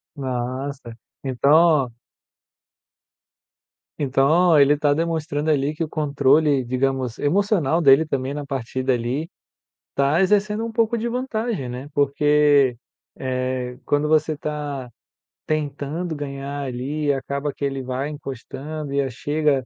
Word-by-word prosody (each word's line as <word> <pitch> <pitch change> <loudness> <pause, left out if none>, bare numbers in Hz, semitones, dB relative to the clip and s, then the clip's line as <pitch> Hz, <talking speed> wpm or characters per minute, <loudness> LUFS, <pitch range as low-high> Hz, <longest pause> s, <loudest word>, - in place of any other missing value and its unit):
Nossa, 130 -1 -4 0.3
então 135 +1 +1 0.3
oh 120 - -13 2.0
Então, 150 +4 +4
ele 140 +1 +6
tá 145 0 +2
demonstrando 160 -1 -1
ali, 145 +1 0
que 165 - -2
o 155 - -4
controle 145 -1 +2
digamos 130 -1 -1
emocional 170 -1 +2
dele 140 +2 +6
também 135 -1 -2
na 145 - -4
partida 130 -1 -2
ali, 125 +7 -2 0.7
tá 140 +5 +2
exercendo 210 +3 +2
um 230 - -5
pouco 230 0 +1
de 235 +2 -2
vantagem, 235 - -2
né. 125 +3 -6
Porque, 145 -2 +3 0.4
eh, 130 -1 -3
quando 145 +1 +1
você 155 0 +2
tá 145 -4 -5 0.6
tentando 155 +2 -2
ganhar 140 0 -5
ali, 135 +4 -3
e 145 - +4
acaba 140 +2 -3
que 140 - -4
ele 135 -1 -2
vai 130 +3 -3
encostando 145 +1 -6
e 140 - +2
a 135 - -2
chega 145 +1 0
145 Hz, 130 wpm, -22 LUFS, 135-155 Hz, 2.0 s, ele